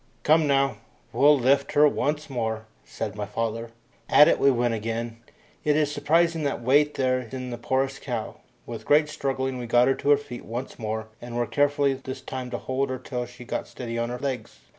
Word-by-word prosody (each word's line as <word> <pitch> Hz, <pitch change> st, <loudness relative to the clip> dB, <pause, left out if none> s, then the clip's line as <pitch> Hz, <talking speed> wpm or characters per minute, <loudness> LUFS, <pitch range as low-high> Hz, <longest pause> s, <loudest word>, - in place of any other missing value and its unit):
"Come 155 Hz, 0 st, +4 dB
now, 135 Hz, -1 st, +2 dB, 0.4 s
we'll 145 Hz, +1 st, +6 dB
lift 140 Hz, +2 st, +2 dB
her 150 Hz, +1 st, +6 dB
once 150 Hz, +1 st, -1 dB
more," 110 Hz, -5 st, -3 dB, 0.2 s
said 105 Hz, -3 st, -5 dB
my 105 Hz, -1 st, -4 dB
father. 115 Hz, +2 st, -3 dB, 0.4 s
At 150 Hz, -, +8 dB
it -, -, +3 dB
we 140 Hz, -, +5 dB
went 120 Hz, -2 st, +1 dB
again; 115 Hz, +1 st, -3 dB, 0.5 s
it 150 Hz, -1 st, +2 dB
is 150 Hz, -1 st, +2 dB
surprising 160 Hz, +3 st, +2 dB
what 140 Hz, -, -1 dB
weight 145 Hz, +4 st, +3 dB
there 130 Hz, -1 st, +1 dB
is 125 Hz, -1 st, -10 dB
in 130 Hz, -1 st, -5 dB
the 120 Hz, -, -4 dB
poorest 135 Hz, +2 st, -1 dB
cow. -, -, -4 dB, 0.3 s
With 115 Hz, -2 st, -7 dB
great 150 Hz, +1 st, +4 dB
struggling 135 Hz, -3 st, -2 dB
we 120 Hz, -, -5 dB
got 120 Hz, +2 st, +4 dB
her 135 Hz, -, +4 dB
to 140 Hz, -, -3 dB
her 145 Hz, -, +7 dB
feet 140 Hz, -4 st, -9 dB
once 120 Hz, +4 st, -6 dB
more, 110 Hz, 0 st, -4 dB
and 120 Hz, 0 st, -7 dB
were 120 Hz, -, +1 dB
careful 145 Hz, 0 st, +2 dB
this 130 Hz, -, -6 dB
time 130 Hz, -1 st, -6 dB
to 120 Hz, -, -3 dB
hold 130 Hz, +2 st, -2 dB
her 130 Hz, -, -2 dB
till 125 Hz, -1 st, -5 dB
she 125 Hz, 0 st, -12 dB
got -, -, -3 dB
steady 115 Hz, -2 st, -5 dB
on 115 Hz, 0 st, -1 dB
her 125 Hz, -, -4 dB
legs. 130 Hz, -4 st, -4 dB
130 Hz, 210 wpm, -25 LUFS, 120-145 Hz, 0.5 s, At